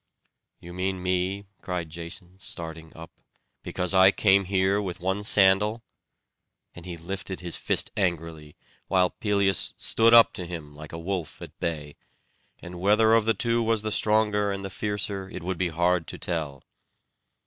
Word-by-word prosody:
"You 85 Hz, 0 st, -11 dB
mean 95 Hz, 0 st, -3 dB
me?" 95 Hz, +2 st, -1 dB, 0.2 s
cried 90 Hz, -4 st, -4 dB
Jason, 85 Hz, +2 st, -9 dB
starting 80 Hz, -3 st, -7 dB
up, 80 Hz, 0 st, -13 dB, 0.4 s
"because 90 Hz, +1 st, -1 dB
I 95 Hz, 0 st, +7 dB
came 100 Hz, 0 st, +3 dB
here 95 Hz, +1 st, +1 dB
with 95 Hz, -4 st, -5 dB
one 95 Hz, +3 st, -2 dB
sandal?" 105 Hz, +2 st, +4 dB, 0.9 s
And 85 Hz, +1 st, -11 dB
he 85 Hz, -2 st, -6 dB
lifted 95 Hz, +2 st, -6 dB
his 85 Hz, -2 st, -4 dB
fist -, -, -1 dB
angrily, 80 Hz, -5 st, -3 dB, 0.3 s
while 90 Hz, -1 st, +2 dB
Pelias 100 Hz, -3 st, 0 dB
stood 115 Hz, +1 st, +3 dB
up 115 Hz, -, +7 dB
to 90 Hz, -, -6 dB
him 80 Hz, -4 st, -8 dB
like 75 Hz, 0 st, -10 dB
a 80 Hz, -, -6 dB
wolf 90 Hz, -1 st, -4 dB
at -, -, -12 dB
bay; 75 Hz, -3 st, -4 dB, 0.7 s
and 90 Hz, 0 st, -8 dB
whether 110 Hz, +3 st, +4 dB
of 115 Hz, -2 st, +4 dB
the 115 Hz, -1 st, +2 dB
two 115 Hz, +3 st, 0 dB
was 110 Hz, -2 st, +1 dB
the 110 Hz, -, -2 dB
stronger 105 Hz, -1 st, +2 dB
and 100 Hz, 0 st, -4 dB
the 95 Hz, -, -6 dB
fiercer, 100 Hz, -1 st, -3 dB
it -, -, -8 dB
would 95 Hz, 0 st, -3 dB
be 90 Hz, -2 st, 0 dB
hard 85 Hz, +1 st, +1 dB
to -, -, -7 dB
tell. 75 Hz, -6 st, -4 dB
95 Hz, 165 wpm, -26 LUFS, 85-100 Hz, 0.9 s, I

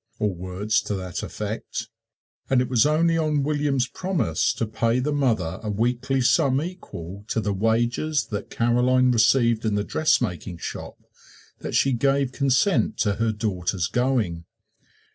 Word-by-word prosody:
or 105 Hz, -2 st, 0 dB
words 95 Hz, +5 st, -1 dB
to 105 Hz, -, -3 dB
that 90 Hz, -2 st, -5 dB
effect. 110 Hz, +1 st, -5 dB, 0.6 s
And 130 Hz, -, +4 dB
it 125 Hz, -, +1 dB
was 125 Hz, +1 st, +4 dB
only 165 Hz, +2 st, +2 dB
on 150 Hz, -3 st, +1 dB
William's 145 Hz, -3 st, +1 dB
promise 135 Hz, -, -1 dB
to 115 Hz, -, -1 dB
pay 115 Hz, +2 st, 0 dB
the 145 Hz, +4 st, -1 dB
mother 110 Hz, -, 0 dB
a 110 Hz, -, -4 dB
weekly 125 Hz, +5 st, 0 dB
sum 130 Hz, +2 st, +3 dB
equal 100 Hz, -, -7 dB
to 115 Hz, -, -1 dB
the 105 Hz, -2 st, -1 dB
wages 120 Hz, +6 st, 0 dB
that 105 Hz, 0 st, -4 dB
Caroline 125 Hz, +2 st, +2 dB
received 115 Hz, -1 st, +3 dB
in 110 Hz, -2 st, 0 dB
the 105 Hz, -, 0 dB
dressmaking 100 Hz, -, 0 dB
shop -, -, -7 dB, 0.6 s
that -, -, -5 dB
she 135 Hz, -, +3 dB
gave 135 Hz, +1 st, +1 dB
consent 140 Hz, -, +1 dB
to 100 Hz, -2 st, 0 dB
her 115 Hz, +1 st, +1 dB
daughter's 95 Hz, -4 st, -2 dB
going. 110 Hz, -8 st, 0 dB
115 Hz, 150 wpm, -24 LUFS, 105-135 Hz, 0.6 s, And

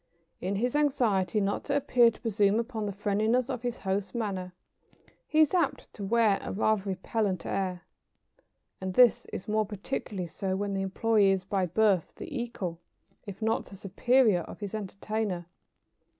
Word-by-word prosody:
In 190 Hz, +3 st, -2 dB
his 245 Hz, +6 st, 0 dB
anxiety 235 Hz, -9 st, +2 dB
not 200 Hz, 0 st, -1 dB
to 285 Hz, -, 0 dB
appear 245 Hz, -4 st, +5 dB
to -, -, -11 dB
presume 210 Hz, -2 st, +2 dB
upon 230 Hz, -3 st, -3 dB
the -, -, -2 dB
friendliness 215 Hz, +6 st, +1 dB
of 250 Hz, -3 st, -4 dB
his 245 Hz, 0 st, -3 dB
host's 195 Hz, +2 st, -2 dB
manner, 195 Hz, -5 st, -3 dB, 0.8 s
he 310 Hz, -, +3 dB
is 310 Hz, -, +4 dB
apt 335 Hz, -7 st, 0 dB
to 205 Hz, -, -7 dB
wear 215 Hz, -1 st, +3 dB
a -, -, -5 dB
rather 215 Hz, +1 st, +2 dB
repellent 195 Hz, -1 st, -2 dB
air. 185 Hz, -2 st, -2 dB, 1.0 s
And 185 Hz, -1 st, -4 dB
this 250 Hz, -2 st, +5 dB
is -, -, -7 dB
more 215 Hz, 0 st, +2 dB
particularly 200 Hz, -2 st, -4 dB
so 190 Hz, +3 st, -3 dB
when 200 Hz, +1 st, -2 dB
the 195 Hz, 0 st, -1 dB
employé 200 Hz, +1 st, +3 dB
is 190 Hz, -1 st, 0 dB
by 190 Hz, -1 st, 0 dB
birth 195 Hz, -1 st, +2 dB
the 340 Hz, -7 st, -8 dB
equal, 210 Hz, -9 st, -4 dB, 0.5 s
if 200 Hz, +2 st, -7 dB
not 225 Hz, +1 st, +1 dB
the 195 Hz, -, -12 dB
superior, 205 Hz, +1 st, +3 dB
of -, -, -10 dB
his 205 Hz, -1 st, -5 dB
entertainer. 205 Hz, -2 st, -3 dB
205 Hz, 165 wpm, -29 LUFS, 190-235 Hz, 1.0 s, appear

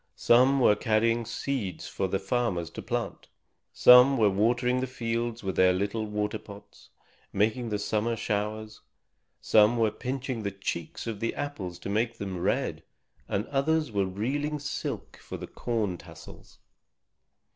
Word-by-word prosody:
Some 130 Hz, +3 st, +4 dB
were 105 Hz, -5 st, +5 dB
carrying 115 Hz, +1 st, +1 dB
seeds 115 Hz, -, -3 dB
for 95 Hz, -, -2 dB
the 95 Hz, -, 0 dB
farmers 95 Hz, -5 st, -1 dB
to -, -, -7 dB
plant. -, -, -4 dB, 0.4 s
Some 125 Hz, +2 st, +7 dB
were 105 Hz, -4 st, +4 dB
watering 120 Hz, +5 st, +2 dB
the 130 Hz, -, -2 dB
fields 115 Hz, -1 st, -3 dB
with 95 Hz, -1 st, -2 dB
their 95 Hz, 0 st, +5 dB
little 100 Hz, +4 st, -2 dB
water 105 Hz, +1 st, -2 dB
pots, 100 Hz, -1 st, -14 dB, 0.4 s
making 110 Hz, +4 st, 0 dB
the 105 Hz, -, -1 dB
summer 110 Hz, +3 st, -1 dB
showers. 110 Hz, 0 st, -3 dB, 0.6 s
Some 110 Hz, +2 st, +4 dB
were 110 Hz, -2 st, +2 dB
pinching 130 Hz, +1 st, -4 dB
the 100 Hz, -, -2 dB
cheeks 100 Hz, -4 st, -5 dB
of 115 Hz, -3 st, -4 dB
the 115 Hz, -, -2 dB
apples 100 Hz, -12 st, -5 dB
to 95 Hz, -, -7 dB
make 115 Hz, +3 st, 0 dB
them 95 Hz, -3 st, -5 dB
red, -, -, -1 dB, 0.5 s
and 100 Hz, -, -1 dB
others 150 Hz, +1 st, +1 dB
were 100 Hz, -2 st, 0 dB
reeling 140 Hz, +10 st, -2 dB
silk 145 Hz, 0 st, -5 dB
for -, -, -8 dB
the -, -, -7 dB
corn 110 Hz, -7 st, -2 dB
tassels. -, -, -14 dB
110 Hz, 150 wpm, -28 LUFS, 100-125 Hz, 0.6 s, Some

